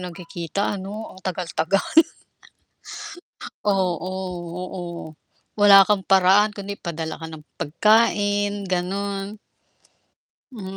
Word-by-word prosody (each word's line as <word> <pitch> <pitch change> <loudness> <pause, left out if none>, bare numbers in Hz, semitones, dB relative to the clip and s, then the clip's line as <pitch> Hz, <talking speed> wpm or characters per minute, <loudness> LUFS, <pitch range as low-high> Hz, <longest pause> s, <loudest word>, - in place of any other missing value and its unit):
nagkikita 175 +1 -5
ano, 195 +1 -7 0.2
ang 185 - -14
tagal 180 -2 -3
tagal. 185 +5 +1 1.7
Oo, 185 -3 +1 0.5
oo. 185 0 -5 0.8
Wala 200 -1 +9
kang 210 -1 +2
paraan 195 +2 +5
kundi 200 0 -6
padala 160 -2 -5
ka 160 - -6
ng 155 -2 -11 0.2
pagkain, 205 +3 +2
gano'n. 195 +3 -3 1.2
Hmm, 195 -4 -7
190 Hz, 95 wpm, -23 LUFS, 180-200 Hz, 1.7 s, Wala